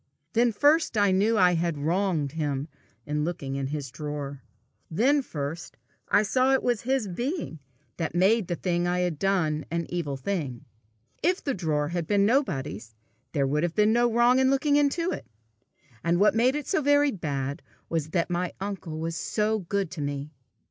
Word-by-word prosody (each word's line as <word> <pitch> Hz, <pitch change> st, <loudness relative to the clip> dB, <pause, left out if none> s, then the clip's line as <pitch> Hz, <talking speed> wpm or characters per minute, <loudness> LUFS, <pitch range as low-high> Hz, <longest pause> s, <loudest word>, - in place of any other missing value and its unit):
Then 235 Hz, +1 st, +3 dB
first 290 Hz, +3 st, +3 dB
I 205 Hz, -2 st, +4 dB
knew 200 Hz, +4 st, +3 dB
that 205 Hz, -4 st, +4 dB
I 180 Hz, 0 st, +5 dB
had 170 Hz, -2 st, 0 dB
wronged 165 Hz, -1 st, 0 dB
him 145 Hz, -2 st, -2 dB, 0.4 s
in 150 Hz, 0 st, -1 dB
looking 145 Hz, -5 st, -3 dB
into 135 Hz, 0 st, -3 dB
his 140 Hz, -4 st, -4 dB
drawer; 145 Hz, -2 st, -5 dB, 0.5 s
then 265 Hz, -, +3 dB
first 155 Hz, -, -6 dB, 0.3 s
I 205 Hz, -, +4 dB
saw 255 Hz, +5 st, +2 dB
it 265 Hz, -, +2 dB
was 240 Hz, -4 st, +1 dB
his 260 Hz, -3 st, 0 dB
being 240 Hz, -, -3 dB, 0.4 s
that 165 Hz, -1 st, -3 dB
made 195 Hz, +3 st, +3 dB
the 175 Hz, -, -1 dB
thing 175 Hz, 0 st, -1 dB
I 180 Hz, 0 st, +1 dB
had 175 Hz, -4 st, -1 dB
done 165 Hz, -6 st, +1 dB
an 170 Hz, 0 st, -2 dB
evil 155 Hz, -6 st, -3 dB
thing. 140 Hz, -4 st, -3 dB, 0.6 s
If 360 Hz, +3 st, +1 dB
the 275 Hz, -, 0 dB
drawer 150 Hz, -7 st, -1 dB
had 170 Hz, -2 st, -3 dB
been 200 Hz, +1 st, +3 dB
nobody's, 135 Hz, -, -1 dB, 0.4 s
there 140 Hz, -3 st, +2 dB
would 145 Hz, +3 st, 0 dB
have 170 Hz, 0 st, -1 dB
been 210 Hz, +1 st, +4 dB
no 240 Hz, 0 st, +3 dB
wrong 240 Hz, +2 st, +4 dB
in 260 Hz, 0 st, +4 dB
looking 285 Hz, +2 st, +2 dB
into 295 Hz, +5 st, +2 dB
it! -, -, -6 dB, 0.8 s
And 170 Hz, +1 st, +2 dB
what 210 Hz, -, +5 dB
made 245 Hz, +4 st, +3 dB
it 295 Hz, -2 st, -3 dB
so 385 Hz, -, +1 dB
very 290 Hz, 0 st, +4 dB
bad 140 Hz, -, -3 dB, 0.3 s
was 160 Hz, -2 st, -2 dB
that 170 Hz, +1 st, 0 dB
my 175 Hz, 0 st, -1 dB
uncle 190 Hz, -5 st, -5 dB
was 165 Hz, +1 st, -3 dB
so 215 Hz, +5 st, 0 dB
good 195 Hz, -1 st, -2 dB
to 170 Hz, -, -5 dB
me! 145 Hz, +1 st, -4 dB
175 Hz, 185 wpm, -27 LUFS, 150-230 Hz, 0.8 s, I